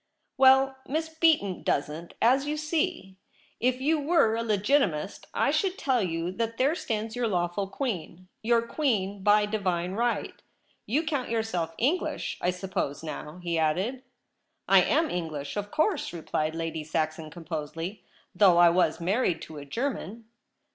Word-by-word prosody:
'Well, 265 0 +5
Miss 320 +3 -2
Beaton 320 - +2
doesn't, 150 +4 -2
as 265 +5 +4
you 300 +1 -1
see. 305 - -2 0.4
If 255 +1 +1
you 305 +4 +2
were 290 -6 +3
a 230 - -1
Legitimist, 210 - 0
I - - +1
should 365 +5 0
tell 260 - +1
you 170 -1 -2
that 230 +3 -3
there 275 +4 +3
stands 220 -8 -3
your 245 -1 0
lawful 180 0 -1
Queen 185 - -4
— - - -50
your 230 +1 +3
Queen 210 -8 -1
by 210 +1 +4
Divine 185 -4 -1
right. 235 +3 -1 0.5
You 285 +9 +1
count 290 -5 -2
yourself 200 -8 -2
English, 295 +10 -1
I 180 - +1
suppose, 180 -6 -3
now 155 0 -6
?' 180 - -14
he 170 -2 0
added. 185 +12 0 0.3
' - - -51 0.3
I - - +7
am 320 -1 +2
English, 155 -5 -4
of 205 0 -3
course,' 320 - 0
replied 160 -1 -2
Lady 165 -1 -3
Saxon 155 0 -2
composedly, 165 +3 -6 0.2
' - - -36
though 185 -2 +5
I 175 -1 +7
was 175 -2 +2
married 185 +2 +1
to 155 -2 -9
a 140 - -9
German.' 230 - -4
205 Hz, 160 wpm, -27 LUFS, 170-265 Hz, 0.5 s, I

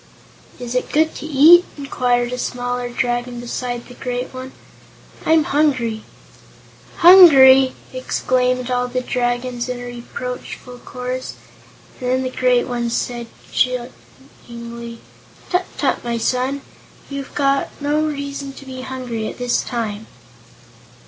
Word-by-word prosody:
"Is 245 -1 -6
it 250 - -1
good 315 +1 +2
to 310 - -7
eat?" 315 +4 +7
inquired 250 -3 0
a 250 - -4
smaller 245 0 -3
Dragon 240 0 -2
beside 245 0 -4
the 245 - -12
great 250 0 -4
one. 260 0 -7 0.8
"I'm 320 -1 +5
hungry." 255 -8 0 1.0
"Hungry!" 270 -8 +9 0.2
exclaimed 255 0 0
all 250 0 +1
the 255 +1 -2
Dragons, 245 0 -2
in 250 -1 -3
a - - -7
reproachful 245 +1 -7
chorus; 255 +1 -5 0.6
and 250 - -3
then 260 +1 +1
the 255 - -3
great 250 -1 +2
one 240 -1 -2
said 240 0 -3 0.2
chidingly: 235 -2 -5 0.5
"Tut 360 0 +1
tut, - - 0
my 235 -1 -2
son! 255 +4 -1 0.5
You've 280 -1 -7 0.4
no 295 +1 0
reason 280 -2 -4
to 275 - -12
be 260 -1 -7
hungry 250 -4 -4
at - - -7
this 245 -1 0
time." 220 -3 -4
250 Hz, 125 wpm, -20 LUFS, 245-265 Hz, 1.0 s, Hungry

